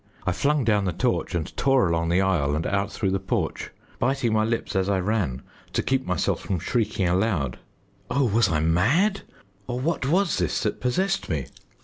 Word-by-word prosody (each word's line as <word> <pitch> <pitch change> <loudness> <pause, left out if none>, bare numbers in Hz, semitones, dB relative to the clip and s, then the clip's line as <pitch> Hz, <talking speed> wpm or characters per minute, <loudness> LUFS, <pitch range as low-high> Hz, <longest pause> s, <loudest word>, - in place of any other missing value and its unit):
I 90 - +2
flung 140 +11 +1
down 105 -3 +2
the 90 - -1
torch 85 - -1
and 80 -3 -3
tore 135 -6 +3
along 85 0 0
the 90 +3 +3
aisle 85 -7 +1
and 80 - -2
out 100 0 0
through 95 -2 -1
the 95 - 0
porch, 95 - -2 0.3
biting 130 -4 +1
my 110 0 +3
lips 115 -2 -2
as 95 +1 +1
I 100 -2 +2
ran 90 - -1 0.3
to - - 0
keep 135 0 0
myself 90 - 0
from 95 - -2
shrieking 105 +1 0
aloud. 90 - 0 0.5
Oh, 135 +3 +2
was 110 -2 +3
I 75 -2 +1
mad 125 - +2 0.5
or 125 0 -3
what 140 -1 -1
was 175 - +2
this 90 - 0
that - - -2
possessed 190 +11 0
me? 75 -7 -1
100 Hz, 195 wpm, -25 LUFS, 90-125 Hz, 0.5 s, tore